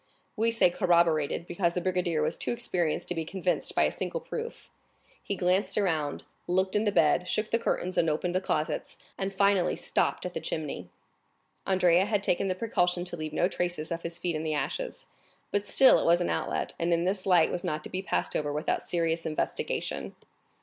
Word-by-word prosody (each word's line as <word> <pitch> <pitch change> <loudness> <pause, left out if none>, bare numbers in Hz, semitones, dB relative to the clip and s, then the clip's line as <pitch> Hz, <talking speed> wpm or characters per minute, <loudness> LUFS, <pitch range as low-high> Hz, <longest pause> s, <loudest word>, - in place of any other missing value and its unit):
We 225 +1 +2
say 230 -6 +3
corroborated, 170 -4 +2
because 175 -1 -1
the - - +1
brigadier 175 -3 0
was - - 0
too - - -2
experienced 185 -10 -1
to - - +1
be 165 -2 -2
convinced 180 +2 -1
by - - +4
a - - +2
single - - -4
proof. 470 -1 -7 0.5
He 200 - -3
glanced 185 +2 +1
around, 160 -8 0 0.2
looked 190 +2 +1
in 210 +1 +2
the 205 - +2
bed, 180 -2 +3
shook 215 +3 -1
the 230 - +2
curtains, 185 -5 -1
opened 165 +2 0
the 185 - +1
closets, 155 -4 -2 0.2
and 195 0 -2
finally 200 -1 +2
stopped - - 0
at - - -4
the - - -3
chimney. - - -4 0.8
Andrea 185 -1 +4
had 205 -1 0
taken 195 0 +1
the 185 - 0
precaution 180 -4 0
to 175 - -3
leave 155 -2 -5
no 175 - +2
traces 175 -4 -3
of 170 0 -2
his 170 0 -4
feet 170 -1 -2
in 155 - -2
the 155 -1 -1
ashes, - - -3 0.5
but 205 0 -1
still 265 +5 +7
it - - -2
was 170 +1 +5
an 175 - 0
outlet, - - -2
and 170 +1 0
in 170 0 +2
this 190 +1 -1
light 175 -4 +5
was 175 - -2
not 155 -4 -2
to - - -8
be 185 - -2
passed 195 - -2
over 145 -1 0
without 150 +1 -1
serious 165 -1 0
investigation. 155 -1 -3
180 Hz, 200 wpm, -28 LUFS, 170-195 Hz, 0.8 s, still